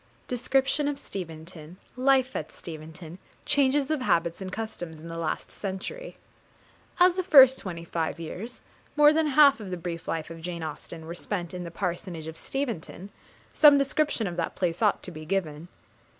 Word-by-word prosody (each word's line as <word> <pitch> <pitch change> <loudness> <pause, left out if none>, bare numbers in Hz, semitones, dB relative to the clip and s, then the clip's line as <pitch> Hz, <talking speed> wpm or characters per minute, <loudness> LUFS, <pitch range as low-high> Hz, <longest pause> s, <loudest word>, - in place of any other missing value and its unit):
Description 270 +4 +1
of 290 -1 -1
Steventon 165 - -8 0.2
Life 260 0 +2
at - - -4
Steventon 160 +2 -9 0.3
Changes 280 +1 +2
of 310 -4 0
Habits 170 -6 +1
and 190 -1 -5
Customs 185 -7 -6
in 165 +2 -10
the 165 - -6
last 165 - -3
Century. 210 - -6 0.8
As 360 0 +6
the 370 - +1
first 265 -7 +8
twenty 170 -4 -6
five 165 -1 -3
years, 190 +9 -7 0.3
more 295 0 +7
than 315 0 +2
half 285 -3 +6
of 205 -3 -7
the 180 - -3
brief 170 -1 -6
life 165 0 -3
of 165 0 -9
Jane 170 -1 -5
Austen, 160 +1 -7
were 165 - -6
spent 175 -1 -4
in 180 -1 -5
the - - -5
parsonage 175 -2 -4
of 160 0 -7
Steventon, 205 - -5 0.4
some 295 -2 +7
description 280 -3 +1
of 175 -2 -4
that 165 - -2
place 175 0 -1
ought 210 -3 +2
to 185 - -7
be 155 -2 -9
given. 160 -2 -2
185 Hz, 175 wpm, -27 LUFS, 165-265 Hz, 0.8 s, first